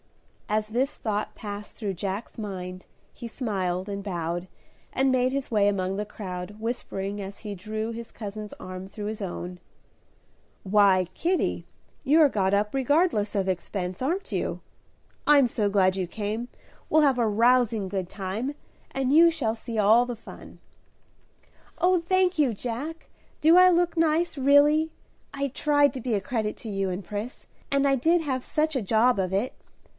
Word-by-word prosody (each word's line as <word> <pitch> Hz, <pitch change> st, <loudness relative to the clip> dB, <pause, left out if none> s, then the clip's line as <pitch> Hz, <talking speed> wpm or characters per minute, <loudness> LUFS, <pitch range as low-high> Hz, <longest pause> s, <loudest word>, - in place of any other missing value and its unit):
As 215 Hz, 0 st, 0 dB
this 260 Hz, +6 st, 0 dB
thought 210 Hz, -2 st, -2 dB
passed 205 Hz, -1 st, -7 dB
through 205 Hz, -4 st, -3 dB
Jack's 195 Hz, +6 st, -5 dB
mind 185 Hz, -4 st, -6 dB, 0.3 s
he 235 Hz, -, -8 dB
smiled 190 Hz, -6 st, -2 dB
and 200 Hz, -1 st, -4 dB
bowed 175 Hz, -2 st, -3 dB, 0.4 s
and 265 Hz, 0 st, +2 dB
made 255 Hz, 0 st, +2 dB
his 275 Hz, 0 st, -3 dB
way 210 Hz, -3 st, +3 dB
among 190 Hz, -1 st, -1 dB
the 210 Hz, +1 st, -2 dB
crowd, 195 Hz, -1 st, -7 dB
whispering 205 Hz, -3 st, -3 dB
as 195 Hz, +1 st, -8 dB
he 210 Hz, -2 st, -6 dB
drew 215 Hz, +4 st, -4 dB
his 230 Hz, 0 st, -8 dB
cousin's 210 Hz, -1 st, -7 dB
arm 185 Hz, +1 st, -8 dB
through 205 Hz, +1 st, -7 dB
his 215 Hz, 0 st, -4 dB
own, 180 Hz, -1 st, -5 dB, 1.0 s
"Why, 195 Hz, -2 st, +4 dB
Kitty, 355 Hz, +2 st, -1 dB, 0.4 s
you're 300 Hz, +2 st, +6 dB
got 195 Hz, -5 st, +1 dB
up 205 Hz, +1 st, +1 dB
regardless 270 Hz, -, +2 dB
of 195 Hz, -1 st, 0 dB
expense, 185 Hz, +1 st, -3 dB
aren't 350 Hz, +10 st, -1 dB
you? -, -, -2 dB, 0.7 s
I'm 285 Hz, -3 st, +6 dB
so 215 Hz, -3 st, 0 dB
glad 190 Hz, -2 st, +3 dB
you 185 Hz, -2 st, -2 dB
came, 215 Hz, +5 st, -4 dB, 0.4 s
we'll 310 Hz, 0 st, +5 dB
have 270 Hz, -4 st, +3 dB
a 235 Hz, -, +3 dB
rousing 230 Hz, -1 st, +3 dB
good 185 Hz, -2 st, -3 dB
time, 210 Hz, +8 st, -4 dB, 0.3 s
and 270 Hz, 0 st, 0 dB
you 335 Hz, +2 st, +8 dB
shall 240 Hz, -9 st, -1 dB
see 230 Hz, 0 st, -6 dB
all 220 Hz, +4 st, +5 dB
the 245 Hz, -2 st, -5 dB
fun." -, -, -12 dB, 1.2 s
"Oh, 360 Hz, -1 st, +3 dB
thank 370 Hz, +1 st, +2 dB
you, 270 Hz, -6 st, +3 dB
Jack! 250 Hz, +9 st, -5 dB, 0.3 s
Do 320 Hz, +3 st, +6 dB
I 365 Hz, 0 st, +8 dB
look 350 Hz, -1 st, +2 dB
nice, 325 Hz, 0 st, +1 dB
really? 290 Hz, +3 st, +4 dB, 0.4 s
I 280 Hz, 0 st, -1 dB
tried 290 Hz, 0 st, +2 dB
to 260 Hz, -, -5 dB
be 235 Hz, -2 st, 0 dB
a -, -, +1 dB
credit 215 Hz, +1 st, -2 dB
to 225 Hz, -, -8 dB
you 195 Hz, -2 st, -1 dB
and 185 Hz, +1 st, -4 dB
Pris, 210 Hz, +6 st, -6 dB, 0.2 s
and 280 Hz, 0 st, +2 dB
I 275 Hz, -, +4 dB
did 325 Hz, +7 st, +3 dB
have 260 Hz, -5 st, -2 dB
such 310 Hz, 0 st, 0 dB
a 260 Hz, -, +1 dB
job 225 Hz, +4 st, +3 dB
of 185 Hz, -1 st, 0 dB
it. 200 Hz, +7 st, 0 dB
220 Hz, 170 wpm, -26 LUFS, 200-275 Hz, 1.2 s, you